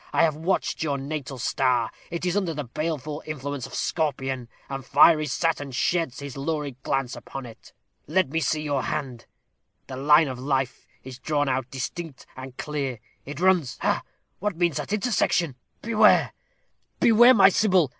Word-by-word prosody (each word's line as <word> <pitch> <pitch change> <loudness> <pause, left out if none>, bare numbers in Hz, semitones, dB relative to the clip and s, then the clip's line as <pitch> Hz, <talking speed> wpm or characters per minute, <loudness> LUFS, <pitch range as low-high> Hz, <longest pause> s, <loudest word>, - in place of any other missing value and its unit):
I - - +4
have 155 -2 +2
watched 165 +5 -1
your 145 -3 0
natal 140 -1 -5
star; 125 -1 +1 0.2
it 170 +1 -4
is 180 0 0
under 185 -6 0
the 150 - -3
baleful 150 +3 -4
influence 145 -3 -4
of - - -10
Scorpion, 135 -6 -2 0.2
and 135 -1 -5
fiery 155 +3 +5
Saturn 145 0 -1
sheds 145 +1 -1
his 140 -2 -7
lurid 140 -2 -3
glance 135 -2 -1
upon 135 -1 -8
it. 115 -2 -13 0.4
Let 185 -6 +2
me 160 +3 0
see 155 -1 0
your 145 -3 0
hand. 130 -6 -4 0.6
The 130 - -7
line 150 +3 +5
of 130 -2 -5
life 135 -1 -2 0.2
is 130 -1 -9
drawn 145 0 0
out 130 -1 -1
distinct 140 +3 -6
and 130 0 -9
clear 140 -4 -3 0.3
it 145 +2 -6
runs 180 -7 +2
ha! - - +1 0.4
what 205 -3 -2
means 170 -4 +1
that 150 +5 -4
intersection? 195 - +1 0.3
Beware 230 -1 +4 0.7
beware, 240 +2 +7
my 195 -2 +7
Sybil. 190 -7 +3
145 Hz, 165 wpm, -25 LUFS, 130-165 Hz, 0.7 s, beware